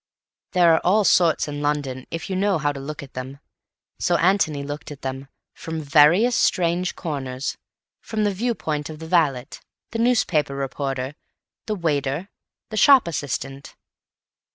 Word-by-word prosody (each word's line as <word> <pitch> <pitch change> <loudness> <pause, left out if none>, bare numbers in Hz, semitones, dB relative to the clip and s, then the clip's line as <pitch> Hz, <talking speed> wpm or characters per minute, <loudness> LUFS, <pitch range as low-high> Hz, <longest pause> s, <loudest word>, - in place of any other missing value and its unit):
There 175 -3 +5
are 160 - +3
all 205 +4 +4
sorts 170 -5 +3
in 145 0 -5
London 145 -3 -2
if 165 +3 -5
you 190 - -3
know 195 0 +2
how 145 -1 0
to 140 - -7
look 145 +2 -6
at 135 - -13
them. 130 +2 -6 0.6
So 175 -1 +2
Antony 165 -6 +2
looked 145 +1 -6
at 145 -2 -10
them—from 135 +4 -7
various 160 - +5
strange 175 0 +1
corners; 135 -4 -4 0.5
from 220 -1 -2
the 205 -1 +1
view 235 +5 -1
point 150 -4 -3
of 155 - -8
the 160 - -9
valet, 150 -7 +2 0.5
the 230 - -3
newspaper 180 - +2
reporter, 135 -1 -3 0.5
the 215 - -1
waiter, 150 0 -1 0.4
the 215 - -4
shop 270 -4 +6
assistant. 135 -2 -4
155 Hz, 155 wpm, -23 LUFS, 140-185 Hz, 0.6 s, shop